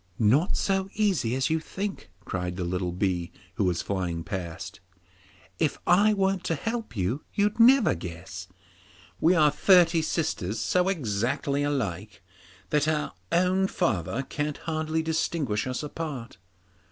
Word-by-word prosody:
'Not 130 - +3
so 195 -1 0
easy 190 - +1
as 130 +3 0
you 160 - +2
think,' 195 +5 -5 0.2
cried 90 -1 -3
the 90 - -3
little 90 0 -2
bee, 90 -2 -1 0.2
who 105 - 0
was 90 -2 0
flying 90 -4 -2
past. 85 -3 -6 0.8
'If 150 - +1
I 200 +5 +5
weren't 195 -1 +1
to 165 - 0
help 225 - -4
you, 100 +11 -1
you'd 210 +2 +1
never 250 +1 +6
guess. 85 +1 -7 0.7
We 170 +3 +4
are 150 -3 +5
thirty 170 +1 +5
sisters 150 - -2
so 180 0 +2
exactly 140 - -1
alike 105 - -3 0.5
that 150 0 +2
our 155 -1 0 0.2
own 185 +2 +3
father 100 - -1
can 145 +2 -3
hardly 160 0 -2
distinguish 155 -8 -1
us 130 +3 -3
apart. 145 -8 -6
145 Hz, 140 wpm, -27 LUFS, -, 0.8 s, never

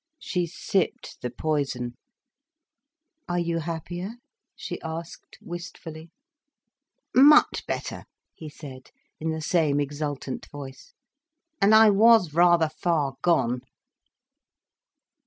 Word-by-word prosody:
She 180 - -2
sipped 180 +2 -2
the 125 - -3
poison. 125 -3 -2 1.3
"Are 175 - 0
you 170 -1 -1
happier?" 175 +5 -5 0.4
she - - -7
asked, 165 +1 -8
wistfully. 170 -2 -9 1.0
"Much 290 +4 +6
better," - - -4 0.3
he 155 - -9
said, 135 -3 -11 0.3
in 160 - -2
the 160 0 -3
same 155 -4 +2
exultant 145 -2 -4
voice, 140 - -11 0.7
"and 210 +2 +6
I 220 -1 +8
was 210 -5 +5
rather 170 -1 +5
far 155 -4 -1
gone." 125 -8 +1
160 Hz, 100 wpm, -25 LUFS, 145-175 Hz, 1.3 s, I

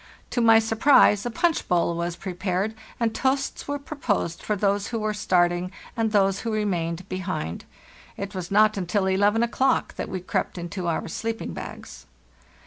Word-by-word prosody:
To 240 - +1
my 225 -1 +7
surprise 225 -1 +4
a - - -1
punch 325 +8 0
bowl 170 -1 +2
was 170 0 -2
prepared, 185 +3 -2 0.3
and 230 -2 +1
toasts 270 +3 -1
were 285 0 -1
proposed 275 - -2
for 210 - -1
those 200 0 +1
who 235 - -3
were 215 -1 -1
starting 175 -2 +1 0.2
and 225 -2 0
those 195 -2 +3
who 230 - -3
remained 180 -5 -1
behind. 185 - -4 0.5
It 200 +1 -5
was 185 -2 -5
not 215 +1 +4
until 190 +1 0
11 205 +4 +3
o'clock 260 +3 +1
that - - -4
we 185 - -3
crept 180 - -2
into 175 +1 -4
our 165 - -1
sleeping 225 +6 -4
bags. - - -9
200 Hz, 165 wpm, -25 LUFS, 180-225 Hz, 0.5 s, my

